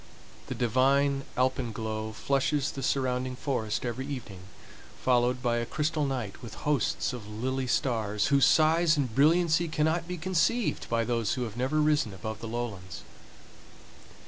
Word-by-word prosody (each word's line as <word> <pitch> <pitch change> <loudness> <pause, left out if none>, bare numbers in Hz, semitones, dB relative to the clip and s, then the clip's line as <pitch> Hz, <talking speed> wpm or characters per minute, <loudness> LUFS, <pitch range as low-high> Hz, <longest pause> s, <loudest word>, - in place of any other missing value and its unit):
The - - -4
divine 135 +3 +2
alpenglow 110 -4 -1
flushes 140 +4 0
the 135 - -6
surrounding 130 -1 0
forest 125 -5 -2
every 125 +3 -3
evening, 125 -9 -6 0.6
followed 125 0 +2
by 120 -1 +1
a 120 - -1
crystal 155 -1 -1
night 120 -7 -4
with 110 -3 -9
hosts 145 -2 0
of 115 -4 -7
lily 130 +5 -2
stars, 110 -5 0
whose 140 -1 +5
size 160 +1 +4
and 130 -6 -1
brilliancy 165 +4 +3
cannot 160 +2 0
be 180 0 -4
conceived 190 +7 0
by 115 0 +1
those 115 -3 0
who 125 - -2
have 110 -3 -6
never 130 +5 0
risen 150 -9 +2
above 110 +2 -6
the 115 - -6
lowlands. 110 -7 -5
130 Hz, 145 wpm, -28 LUFS, 115-145 Hz, 0.6 s, whose